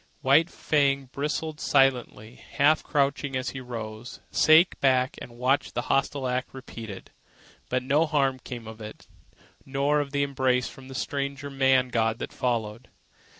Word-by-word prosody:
White 150 +6 +4
Fang, 140 -5 0
bristling 150 +2 -3
silently, 125 -6 +1 0.2
half 150 +2 +4
crouching 140 -2 0
as 130 0 -2
he 130 - -7
rose, 115 -1 -7
sank 160 +3 +5
back 130 -1 +2
and 120 -1 -10
watched 130 +3 0
the - - -1
hostile 135 -1 0
act 125 +1 -3
repeated. 115 -6 -9 0.6
But 125 0 0
no 145 +5 +2
harm 135 -4 +1
came 120 -2 -8
of 110 0 -10
it, 105 0 -10 0.6
nor 140 +2 +1
of 145 -1 -2
the 140 0 0
embrace 130 -2 +1
from 130 -1 -12
the 135 - -9
strange 140 0 -3
man 135 -2 +2
god 115 -2 0
that - - -6
followed. 115 -2 -2
135 Hz, 150 wpm, -26 LUFS, 125-140 Hz, 0.6 s, sank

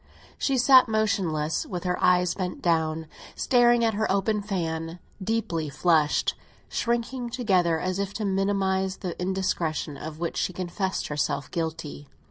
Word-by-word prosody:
She 270 -2 +1
sat 255 +1 +7
motionless, 185 -8 0
with 180 -2 -5
her 180 -1 -1
eyes 180 -1 +4
bent 180 -2 -4
down, 160 -2 0 0.3
staring 240 -2 +4
at 225 - +2
her 215 0 0
open 205 +2 +1
fan, 165 -4 -3 0.3
deeply 180 -8 -1
flushed, 150 +1 +2 0.4
shrinking 240 +1 -1
together 185 -9 +1
as 185 +2 -2
if 200 -1 -2
to 215 - -2
minimise 190 -1 0
the 180 -4 -5
indiscretion 175 -5 -1
of 155 -1 -7
which 170 -1 -3
she 185 - -1
confessed 185 +2 -3
herself 145 -2 -2
guilty. 160 - -4
185 Hz, 140 wpm, -26 LUFS, 165-210 Hz, 0.4 s, sat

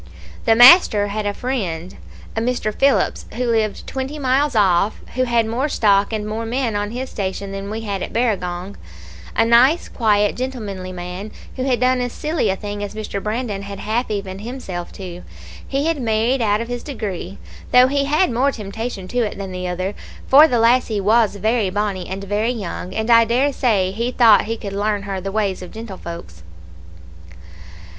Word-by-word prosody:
"The 225 - +5
master 240 - +7
had 210 0 -2
a 205 - -1
friend, 190 -9 -3 0.4
a 225 - 0
Mr. 230 -3 -1
Phillips, 275 +4 +1
who 250 +2 -1
lived 220 -2 -1
twenty 265 +3 -4
miles 275 0 +1
off, 195 0 +2
who 255 0 +1
had 235 -2 +2
more 245 +7 -1
stock 200 -5 +2
and 215 -1 -3
more 220 +2 -3
men 235 -1 -1
on 205 0 -1
his 250 +3 -5
station 195 0 -4
than 195 0 -5
we 220 +2 -4
had 200 -3 -3
at - - -4
Barragong; 195 -5 -2 0.6
a 225 - +3
nice 250 +8 +4
quiet 210 -3 +1
gentlemanly 210 -8 -5
man, 180 +3 -6 0.3
who 255 - -3
had 250 -4 +1
done 255 0 +2
as 245 -1 -3
silly 310 +1 -1
a 190 - +1
thing 205 +1 -5
as 205 +1 -6
Mr. 210 -2 -4
Brandon 215 -1 -3
had 200 0 -7
half 225 +5 -2
evened 200 -2 -4
himself 210 -7 -6
to. 180 -2 -8 0.5
He 275 +2 -1
had 325 -4 0
married 230 +3 +1
out 210 -1 +2
of 230 - -5
his 245 0 -4
degree, 205 - -5 0.3
though 250 0 +7
he 280 +1 +1
had 305 +5 +2
more 260 +4 +2
temptation 215 -2 -6
to 245 - -1
it 220 -4 -1
than 195 -1 -6
the 180 0 -4
other, 185 +2 -3 0.3
for 295 +4 +7
the 245 - +1
lassie 230 -2 +3
was 215 +1 +3
very 215 0 +1
bonnie, 200 -2 -2
and 190 +1 -5
very 205 +3 0
young, 190 -5 -5
and 220 +2 0
I 230 0 +7
dare 255 +5 +1
say 200 -9 +1
he 235 +5 -2
thought 230 -4 +5
he 225 +1 -3
could 200 -3 -6
learn 205 0 -1
her 195 -2 -4
the 195 +1 -4
ways 200 -3 -1
of 180 - -8
gentlefolks. 170 - -9
215 Hz, 190 wpm, -20 LUFS, 195-245 Hz, 0.6 s, master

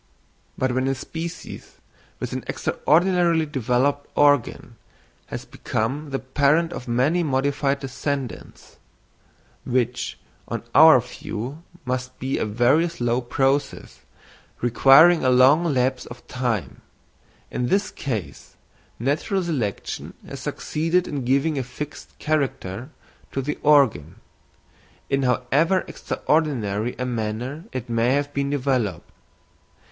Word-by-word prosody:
But 130 -1 0
when 130 +1 0
a 135 - +1
species 165 +6 -7 0.4
with - - -4
an - - -4
extraordinarily 170 +1 +2
developed 140 +1 0
organ 145 -4 +2 0.5
has - - -6
become 135 +7 -3
the 135 - -1
parent 145 +6 +1
of 125 - -7
many 130 +9 +2
modified 140 -1 0
descendants—which 130 -2 -5 0.3
on - - -4
our 160 -3 +8
view 125 +4 -7 0.2
must 125 0 -3
be 130 +1 -2
a - - -1
very 125 +10 +3
slow 120 -6 -1
process, 135 +3 -1 0.6
requiring 135 +8 +6
a 130 - +3
long 130 +6 +5
lapse 130 -4 0
of 120 0 -12
time—in 120 - -5
this 205 +7 +1
case, 110 - -5 0.4
natural 150 - 0
selection 130 - -3
has - - -7
succeeded 165 +4 -1
in 140 -4 -4
giving 140 +3 +1
a - - -1
fixed 145 +4 -8
character 130 -7 -2 0.4
to - - -3
the 140 +3 -3
organ, 135 - +3 1.0
in 135 0 +2
however 135 +8 +2
extraordinary 120 -8 -1
a 125 - -2
manner 120 - -3
it 125 -1 -5
may 115 +2 +1
have 145 0 -2
been 140 0 -1
developed. 130 - -1
135 Hz, 110 wpm, -23 LUFS, 125-150 Hz, 1.0 s, our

